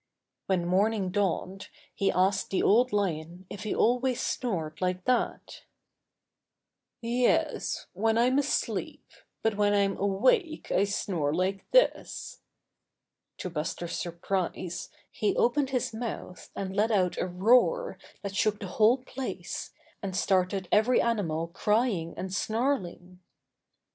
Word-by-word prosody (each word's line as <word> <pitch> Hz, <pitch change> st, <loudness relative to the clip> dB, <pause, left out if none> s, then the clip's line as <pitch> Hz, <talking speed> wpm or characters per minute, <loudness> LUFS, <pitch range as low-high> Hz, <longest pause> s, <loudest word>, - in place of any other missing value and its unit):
When 185 Hz, -3 st, +1 dB
morning 195 Hz, +1 st, +1 dB
dawned 195 Hz, -1 st, -1 dB, 0.2 s
he 195 Hz, -, +1 dB
asked 190 Hz, +1 st, +1 dB
the 190 Hz, -, 0 dB
Old 245 Hz, +4 st, +4 dB
Lion 175 Hz, -3 st, -2 dB
if 205 Hz, -, -7 dB
he 215 Hz, -, -2 dB
always 250 Hz, +1 st, +2 dB
snored 165 Hz, -10 st, -2 dB
like 180 Hz, 0 st, -1 dB
that 255 Hz, -1 st, -1 dB, 1.4 s
*'Yes, 240 Hz, +1 st, 0 dB
when 220 Hz, +4 st, +1 dB
I'm 250 Hz, +4 st, +4 dB
asleep, 285 Hz, 0 st, -2 dB, 0.4 s
but 220 Hz, -2 st, +1 dB
when 205 Hz, 0 st, +3 dB
I'm 200 Hz, -1 st, +2 dB
awake 255 Hz, -, +1 dB
I 195 Hz, -, +3 dB
snore 180 Hz, -7 st, -1 dB
like 190 Hz, +2 st, -1 dB
this." -, -, +1 dB, 1.0 s
To 185 Hz, -, -5 dB
Buster's 165 Hz, +2 st, -3 dB
surprise 175 Hz, 0 st, -3 dB, 0.2 s
he 210 Hz, -, 0 dB
opened 270 Hz, +3 st, +2 dB
his 250 Hz, -4 st, -1 dB
mouth 220 Hz, -5 st, -6 dB
and 190 Hz, -1 st, -4 dB
let 210 Hz, +2 st, +2 dB
out 185 Hz, -5 st, +1 dB
a -, -, 0 dB
roar 245 Hz, -, +3 dB, 0.2 s
that 200 Hz, -1 st, -5 dB
shook 215 Hz, 0 st, +1 dB
the 205 Hz, -, -5 dB
whole 225 Hz, +4 st, +6 dB
place 260 Hz, 0 st, -6 dB, 0.3 s
and 195 Hz, -3 st, -4 dB
started 185 Hz, 0 st, +1 dB
every 225 Hz, +4 st, +4 dB
animal 170 Hz, -9 st, 0 dB
crying 210 Hz, -3 st, 0 dB
and 190 Hz, 0 st, -5 dB
snarling. 195 Hz, -6 st, -2 dB
200 Hz, 125 wpm, -28 LUFS, 185-235 Hz, 1.4 s, whole